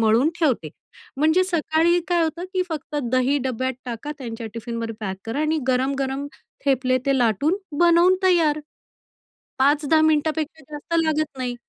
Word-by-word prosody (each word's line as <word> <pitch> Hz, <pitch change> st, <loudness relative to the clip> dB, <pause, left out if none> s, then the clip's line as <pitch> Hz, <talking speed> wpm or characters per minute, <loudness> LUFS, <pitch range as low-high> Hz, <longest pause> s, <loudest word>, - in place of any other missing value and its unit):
मळून 225 Hz, +6 st, +4 dB
ठेवते 255 Hz, -, +1 dB, 0.5 s
म्हणजे 315 Hz, +6 st, +3 dB
सकाळी 335 Hz, 0 st, +2 dB
काय 345 Hz, -1 st, +2 dB
होतं 330 Hz, +2 st, -2 dB
की 370 Hz, -1 st, +1 dB
फक्त 300 Hz, -2 st, -5 dB, 0.2 s
दही 255 Hz, +3 st, +2 dB
डब्यात 260 Hz, +1 st, -1 dB
टाका, 245 Hz, +4 st, -5 dB
त्यांच्या 230 Hz, -3 st, -6 dB
टिफिनवर 230 Hz, 0 st, -4 dB
पॅक 190 Hz, -3 st, -3 dB
करा 230 Hz, +6 st, -2 dB
आणि 310 Hz, +1 st, +1 dB
गरम-गरम 270 Hz, +2 st, 0 dB, 0.4 s
थेपले 255 Hz, -2 st, +2 dB
ते 275 Hz, -, +3 dB
लाटून 245 Hz, -, +2 dB, 0.2 s
बनवून 345 Hz, +1 st, +5 dB
तयार. 325 Hz, -5 st, +3 dB, 1.0 s
5-10 295 Hz, +3 st, +3 dB
मिनिटापेक्षा 315 Hz, 0 st, 0 dB
जास्त 295 Hz, +3 st, -7 dB
लागत 310 Hz, -3 st, -1 dB
नाही 250 Hz, -1 st, -3 dB
290 Hz, 140 wpm, -23 LUFS, 255-315 Hz, 1.0 s, बनवून